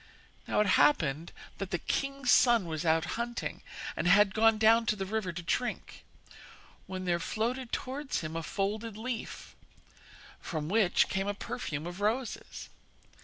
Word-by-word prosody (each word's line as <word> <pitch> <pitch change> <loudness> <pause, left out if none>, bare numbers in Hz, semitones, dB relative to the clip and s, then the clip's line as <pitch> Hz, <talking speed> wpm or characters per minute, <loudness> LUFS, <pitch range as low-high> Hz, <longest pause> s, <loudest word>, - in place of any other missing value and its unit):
Now - - +2
it - - +3 0.2
happened 160 - +2 0.3
that 195 -2 -4
the 175 - 0
king's 275 - -1
son 235 -6 +5
was 160 -1 -4
out 160 0 +3
hunting, 235 0 -4 0.3
and - - -1
had 195 +1 +5
gone 225 0 +4
down 225 +1 +5
to - - +2
the 195 -2 -3
river 205 -2 -2
to 175 +1 -7
drink, 245 +8 -3 0.8
when 185 0 -5
there 175 -1 +1
floated 235 +7 -2
towards 270 +2 -3
him 155 0 -5
a 165 - -2
folded 210 +5 -3
leaf, 235 +1 -6 0.8
from 155 -2 -4
which 200 -3 +3
came 195 +1 -1
a 205 - -1
perfume 155 -5 -5
of 175 +3 -7
roses. 230 +4 -2
205 Hz, 155 wpm, -30 LUFS, 175-230 Hz, 0.8 s, son